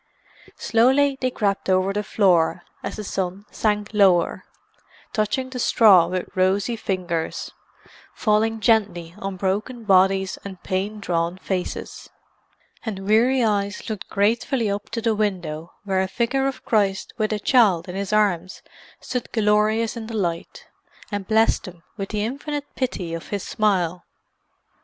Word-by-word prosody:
Slowly 265 +4 +3
they 255 - +2
crept 200 -5 -1
over 185 +1 +2
the 210 - 0
floor, 180 -5 +2 0.2
as - - -5
the 215 - -6
sun 195 0 -3
sank 210 -1 -1
lower, 190 -5 +3 0.7
touching 250 +4 -1
the 255 - -5
straw 205 -7 +6
with 185 0 -3
rosy 190 +5 +1
fingers, 180 -6 -3 0.6
falling 220 0 +1
gently 200 -7 +1
on 195 -1 -4
broken 205 +6 -2
bodies 190 -1 +3
and 190 -2 -9
pain 200 +3 -2
drawn 170 -2 -1
faces; 185 -1 -4 0.7
and 195 -4 -5
weary 240 +4 +4
eyes 205 0 -1
looked 215 - -6
gratefully 225 +2 +1
up 200 +1 -4
to 230 0 -3
the 225 - +2
window 175 -7 -2
where 190 -2 0
a 190 - 0
figure 250 +7 0
of 270 - -5
Christ 195 -3 +1
with 215 0 +1
a 215 - 0
child 200 -6 +3
in 180 - -6
His 200 +1 -3
arms 195 -4 +1 0.4
stood 250 -1 -4
glorious 215 +1 +2
in 225 -2 -6
the 225 -1 -4
light, 170 -4 -3 0.5
and 205 -2 -3
blessed 220 +1 +3
them 175 -3 -11
with 195 -3 -5
the 210 -1 -1
infinite 285 +4 -4
pity 185 -10 -3
of 165 - -6
His 205 -2 -3
smile. 180 -5 0
205 Hz, 145 wpm, -23 LUFS, 185-225 Hz, 0.7 s, straw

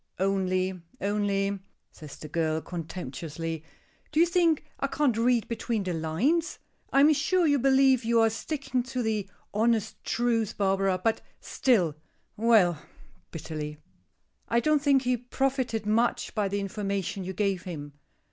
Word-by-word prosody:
only 185 -1 0 0.2
only," 200 -1 0 0.3
says 150 -3 -11
the 155 - -8
girl, 160 0 0
contemptuously. 165 -1 -6 0.5
"Do 305 - +1
you 335 - +7
think 340 -3 +2
I 275 - 0
can't 275 -4 +1
read 235 0 +2
between 230 -2 -2
the 185 -2 -2
lines? 195 - 0 0.3
I 275 - +5
am 305 +2 +7
sure 340 +5 +2
you 285 -2 +3
believe 265 -1 +4
you 230 0 +3
are 225 0 +4
sticking 270 +1 -2
to 255 0 -3
the 215 -3 -1 0.2
honest 220 0 0
truth, 230 -3 0
Barbara, 195 -1 +2
but 225 -1 +1 0.2
still 195 - +1 0.4
Well," 205 -8 +4 0.5
bitterly, 155 -2 -6 0.7
"I 235 - +2
don't 305 +2 +2
think 275 -2 +3
he 250 0 +2
profited 250 -2 -1
much 225 +3 +1
by 210 -3 0
the 200 +1 -2
information 195 -1 -3
you 190 +1 -5
gave 195 -2 0
him. 150 -6 -7
215 Hz, 145 wpm, -28 LUFS, 185-255 Hz, 0.7 s, you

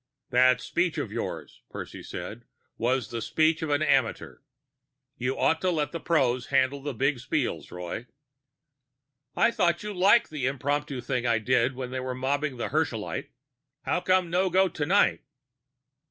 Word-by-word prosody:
"That 125 0 +5
speech 175 -1 0
of - - -3
yours," - - -5
Percy - - -7
said, - - -7 0.3
"was 125 +1 0
the 115 -1 -3
speech 160 +7 +2
of 160 - -2
an 145 +1 +2
amateur. - - +1 0.8
You 125 +2 -2
ought 160 - +2
to 185 - +2
let 155 -4 0
pros 130 -7 +1
handle 135 +1 +2
the 140 -2 -4
big 135 +3 +1
spiels, 120 - -2
Roy." 90 +7 -6 1.3
"I - - +4
thought 170 -4 +1
you 210 0 -4
liked 200 +4 +4
the 140 -4 -1
impromptu 140 0 -2
thing 125 -1 -1
I 115 -1 +3
did 125 +3 +1
when 130 -1 -5
they 130 - -3
mobbed 130 +2 -2
that 120 - -3
Herschelite. - - -2 0.5
How - - 0
come 185 -2 +2
no 185 +2 +2
go 190 +2 +4
tonight?" 175 +4 +2
140 Hz, 155 wpm, -27 LUFS, 125-165 Hz, 1.3 s, That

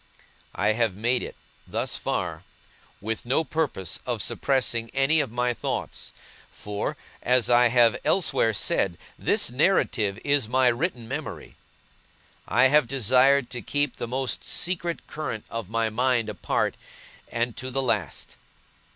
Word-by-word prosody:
I - - +1
have 110 -3 +1
made 120 +5 +1
it, - - -7 0.3
thus - - -1
far, - - -3 0.6
with 110 +2 -3
no 130 +6 +1
purpose 135 - -2
of 120 -3 -2
suppressing 115 -1 0
any 135 +4 +4
of 130 - -1
my 125 +1 0
thoughts; - - -4 0.4
for, 105 0 -4 0.2
as 125 -1 +2
I 120 0 +6
have 120 -1 +4
elsewhere 165 -10 +2
said, 90 -3 +1 0.2
this - - +2
narrative 120 - +2
is 140 -6 +2
my 130 0 +4
written 120 -2 -2
memory. - - -6 0.9
I 125 +2 +4
have 150 -2 +4
desired 130 +2 +3
to 125 - -4
keep 145 +4 -1
the - - -4
most 130 +1 -2
secret 175 -1 -2
current 150 -8 -5
of 115 -4 -5
my 115 0 0
mind 120 -1 +1
apart, 105 - -1 0.6
and 115 0 -1
to 130 - -5
the 135 +1 -1
last. 105 - -2
125 Hz, 140 wpm, -25 LUFS, 115-135 Hz, 0.9 s, I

